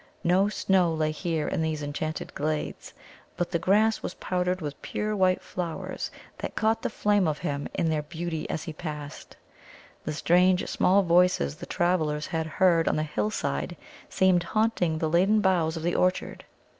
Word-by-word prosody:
No 185 +4 +3
snow 190 -4 +2
lay 155 -1 0
here 160 -1 -2
in - - -1
these 155 -2 -2
enchanted 155 +2 -4
glades, 155 +1 -3 0.4
but 175 - -2
the 170 - +1
grass 215 +5 +3
was - - -5
powdered 180 0 -1
with 145 -4 -6
pure 210 0 -2
white 185 -2 +2
flowers 170 -3 -4 0.3
that - - -5
caught 225 +1 +1
the - - -1
flame 205 -4 +2
of 150 -1 0
him 145 -1 -3
in 165 - +1
their 155 -1 0
beauty 160 +1 -5
as 155 - -3
he 160 - -6
passed. 150 -2 -7 0.7
The 155 - -3
strange 180 +4 +3
small 195 +2 +3
voices 170 - +3
the - - -9
travellers 160 -4 0
had 160 -1 -2
heard 170 -3 +4
on - - +2
the 155 - 0
hillside 105 - -2 0.3
seemed 185 -2 +3
haunting 180 -3 0
the 160 - 0
laden 190 +7 +3
boughs 175 -5 +2
of 160 - -6
the 175 +1 0
orchard. 185 0 0
170 Hz, 170 wpm, -27 LUFS, 155-185 Hz, 0.7 s, heard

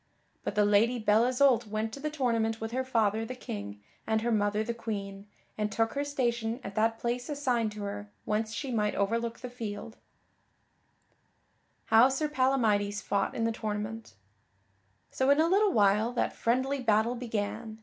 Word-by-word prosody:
But - - -3
the 210 0 +4
Lady 215 +4 +3
Belle 215 0 +3
Isoult 250 -3 +3
went 215 +1 -3
to - - -7
the 305 +2 -2
tournament 230 -6 0
with 225 0 -4
her 260 +2 -1
father, 225 -4 +1
the 255 +3 -6
King, 100 - -7 0.2
and 220 0 +1
her 235 +1 0
mother, 210 0 +1
the 235 - -3
Queen, 200 -3 -5 0.3
and 210 0 0
took 225 +1 0
her 285 - -1
station 235 -5 -1
at 195 - -6
that 225 +2 +1
place 245 +3 -3
assigned 250 -7 0
to 210 -1 -6
her 205 +1 -5 0.2
whence 215 +1 -1
she 270 +3 -4
might 210 -3 0
overlook 230 +3 -1
the 250 - -5
field. 225 -1 -6 1.9
[Sidenote: - - -43
How 225 +4 +6
Sir 295 +3 -1
Palamydes 220 -7 +1
fought 200 -1 -1
in 230 - -1
the 230 - +2
tournament] 215 - -5 1.0
So 260 +1 +1
in 285 +1 +5
a 320 - +4
little 400 +3 +3
while 210 - +3
that 245 - 0
friendly 260 +4 0
battle 220 0 +2
began. 220 -2 -4
225 Hz, 175 wpm, -29 LUFS, 210-250 Hz, 1.9 s, How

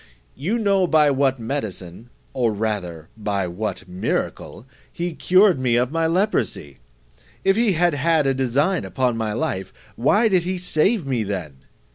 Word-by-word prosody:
You 180 - -2
know 200 -4 +2
by 155 -3 +4
what 135 -1 +1
medicine, 110 -4 -5 0.2
or 120 -4 +1
rather 100 -7 -4
by 100 -3 -2
what 95 +1 -5
miracle, 90 +4 -3 0.3
he 175 0 -4
cured 185 0 +4
me 125 -2 +1
of 125 +2 +1
my 165 0 +1
leprosy: 170 - -1 0.6
If 195 - +3
he 225 -3 +2
had 175 0 +2
had 155 +2 +2
a 135 - +2
design 135 +8 0
upon 125 -3 -1
my 110 -2 -2
life, 115 -8 -3 0.2
why 205 - +3
did 185 -4 +3
he 185 +2 -3
save 180 +2 +1
me 125 -5 -1
then? 90 -9 -5
135 Hz, 155 wpm, -22 LUFS, 105-175 Hz, 0.6 s, by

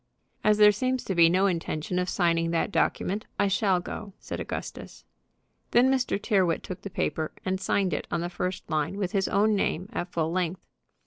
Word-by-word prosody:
"As 210 0 +4
there 210 -1 +8
seems 255 +5 -1
to 190 - -2
be 170 -2 +6
no 185 +3 +3
intention 170 -1 -1
of 180 0 -1
signing 165 -2 +1
that 165 +4 0
document, 200 +1 0
I 205 - +3
shall 195 -2 +2
go," 200 +3 -7
said - - -6
Augustus. - - -7 0.6
Then 250 +3 +4
Mr. 255 -6 +1
Tyrrwhit 190 -5 +1
took 185 -1 -7
the 200 - -6
paper, 155 -3 -2
and 190 0 -1
signed 195 -3 +1
it - - -3
on 170 - -1
the 175 - -2
first 180 +1 -4
line 155 +3 -1
with 195 -3 -2
his 195 -3 +1
own 210 +2 +3
name 190 -1 -1
at 175 0 -3
full 160 -2 -1
length. 180 0 -2
185 Hz, 195 wpm, -27 LUFS, 170-205 Hz, 0.6 s, there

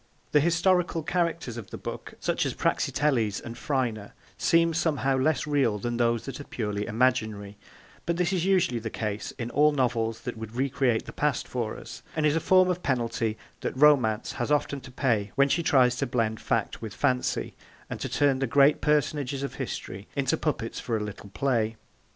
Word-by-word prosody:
The 150 - +5
historical 170 +1 +2
characters 170 -7 -1
of 110 -5 -8
the - - -7
book, - - -7
such - - 0
as - - -4
Praxiteles 120 -9 +1
and 120 -1 -8
Phryne, 120 -6 -2 0.2
seem 165 -1 +3
somehow 150 -4 +1
less 130 +2 +1
real 140 -8 +1
than 120 +3 -3
those 115 -1 +1
that 135 - -6
are - - -6
purely 105 -3 -3
imaginary, 110 -4 0 0.5
but 170 0 0
this 180 +1 +1
is 180 -3 0
usually 180 -11 +2
the 110 0 -4
case 105 -1 -3
in 120 -1 -4
all 150 +2 +4
novels 115 -5 0
that 125 -4 -5
would 110 0 -8
recreate 130 -3 +1
the - - -9
past 150 -3 0
for 115 -3 -3
us, - - -10
and 155 -1 +1
is 150 0 +3
a - - +3
form 185 +2 +5
of 180 -1 -1
penalty 115 -5 -1 0.2
that - - -4
Romance 130 -7 +4
has 120 +4 -3
often 145 -1 +1
to 130 - -11
pay 110 -6 0
when 140 +1 +4
she 160 +5 +2
tries 130 -6 +4
to - - -1
blend 115 -3 0
fact - - -1
with 110 -2 -6
fancy, 125 +6 0 0.3
and - - -6
to - - -3
turn 140 -2 +2
the 135 - 0
great 140 +1 +4
personages 145 -2 0
of 140 - -4
history 95 +2 -5
into 135 -2 +1
puppets 135 -7 -2
for 115 -2 -1
a 105 - -3
little 100 -1 -8
play. 115 -2 0
130 Hz, 190 wpm, -27 LUFS, 115-150 Hz, 0.5 s, The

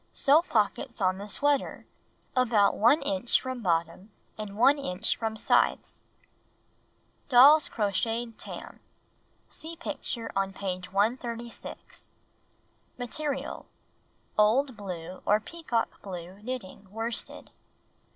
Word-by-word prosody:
Sew 295 +3 +5
pockets 235 - -1
on 185 -1 +1
the 205 - -7
sweater, 285 +6 0 0.5
about 230 -5 +3
1 275 +8 +4
inch 280 -4 +2
from 260 -1 -5
bottom 170 +1 -1 0.3
and 210 -2 -7
1 270 +5 +5
inch 195 -5 -1
from 220 -1 -3
sides. - - +1 1.3
Doll's 280 +4 +7
Crocheted 225 +3 -1
Tam - - -8 0.7
(See 325 +2 -7
picture 275 -7 -4
on 195 0 0
page 185 -2 -4
136) 235 +3 -3 0.8
Material: 275 +3 -3 0.7
Old 250 +5 +3
blue 185 -3 -7
or 210 +1 +3
peacock 245 -2 -3
blue 185 0 -8
knitting 215 -5 -7
worsted. 225 +3 -4
225 Hz, 100 wpm, -28 LUFS, 200-260 Hz, 1.3 s, Doll's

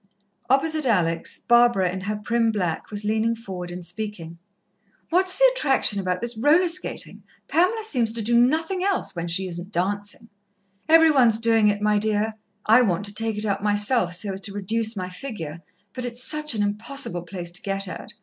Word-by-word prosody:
Opposite 305 +2 +2
Alex, 170 -7 0
Barbara, 235 -6 +3
in 190 +1 -5
her 210 +2 -3
prim 230 +2 0
black, 180 -6 -3
was 210 0 -4
leaning 220 +2 +1
forward 190 -6 -7
and 175 0 -8
speaking: 175 -3 -7 0.7
"What's 370 +2 +2
the - - +7
attraction 270 - +1
about 185 -1 -2
this 235 0 0
roller 305 +10 +3
skating? 365 +2 -3 0.3
Pamela 370 +7 +1
seems 245 - 0
to 230 -1 -3
do 235 +3 +1
nothing 320 +10 +2
else, 395 - -1
when 170 0 -4
she 185 +3 -1
isn't 175 +2 -7
dancing." 205 +4 -3 0.6
"Every 325 0 +7
one's 240 -6 +4
doing 225 -1 +3
it, 205 0 0
my 210 0 +3
dear. 215 +1 0 0.3
I 225 +4 +6
want 195 -4 0
to 205 - +3
take 225 0 0
it 210 - 0
up 195 -2 -1
myself, 205 -2 +1
so 195 +2 -3
as 190 - -6
to 200 0 -5
reduce 220 +2 -2
my 185 -1 -4
figure, 175 - -7 0.3
but 255 - -5
it's 245 0 -3
such 300 -3 0
an 210 - 0
impossible 205 -2 -1
place 175 0 -5
to 180 - -6
get 195 0 -2
at. 180 - -8
215 Hz, 190 wpm, -23 LUFS, 190-245 Hz, 0.7 s, the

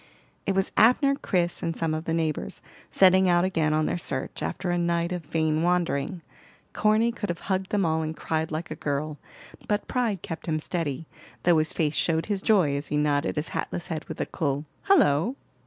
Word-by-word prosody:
It 195 - +1
was 195 0 +1
Abner, 250 +5 +5
Chris, 175 -10 -1
and 165 -1 -2
some 165 -1 0
of 155 +1 -3
the 165 - -1
neighbors, 155 - -2 0.3
setting 190 0 +5
out 175 0 +4
again 165 -5 +1
on 155 0 +2
their 175 - -1
search, 135 -5 -4
after 180 - -2
a 175 - +1
night 170 0 0
of 180 -1 -2
vain 160 0 0
wandering. 175 -1 0 0.5
Corny 215 +2 +3
could 215 -3 -5
have 170 -1 -3
hugged 190 -1 -1
them 205 -3 +1
all 160 0 +1
and 160 0 -4
cried 160 0 -1
like 160 +1 -4
a - - -3
girl; 145 +1 -3 0.5
but 210 -1 -1
pride 230 -8 -1
kept 165 - -6
him 155 -1 +1
steady, 160 -2 -3 0.4
though 170 -2 +5
his 155 - +1
face 155 -2 0
showed 160 0 +1
his 205 -2 -2
joy 185 -11 +3
as 140 +1 -3
he 150 - -1
nodded 150 0 +1
his 150 +1 -2
hatless 175 +1 -4
head 155 -2 -4
with - - -8
a - - 0
cool 145 -1 -2 0.2
"Hullo!" 245 - +4
165 Hz, 205 wpm, -26 LUFS, 155-190 Hz, 0.5 s, Abner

